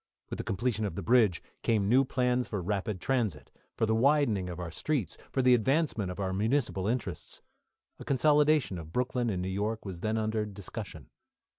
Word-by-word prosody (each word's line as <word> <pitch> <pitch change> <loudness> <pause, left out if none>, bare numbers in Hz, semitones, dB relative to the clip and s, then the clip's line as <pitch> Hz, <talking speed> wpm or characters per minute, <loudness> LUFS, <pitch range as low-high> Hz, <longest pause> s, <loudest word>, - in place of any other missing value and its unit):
With - - -3
the - - -2
completion 110 +2 -1
of 95 - -4
the 100 - -4
bridge 110 -5 +3 0.2
came 105 -4 +1
new 130 +5 +5
plans 125 -1 0
for 105 - -3
rapid 100 +2 -2
transit, 110 - -1 0.3
for - - +2
the 110 - +1
widening 115 -6 +2
of 90 0 -6
our 85 -2 -5
streets, 135 - -2 0.2
for 130 - +1
the 125 0 +6
advancement 125 - +1
of 90 - -6
our 95 -1 -1
municipal 110 -1 0
interests. 120 +2 -4 0.6
A - - -7
consolidation 145 - +3
of 80 -1 -9
Brooklyn 125 +2 0
and 90 -4 -2
New - - -2
York 105 +4 -2
was 95 -3 -6
then 110 +2 0
under 110 0 0
discussion. 100 -2 -8
110 Hz, 185 wpm, -30 LUFS, 95-125 Hz, 0.6 s, the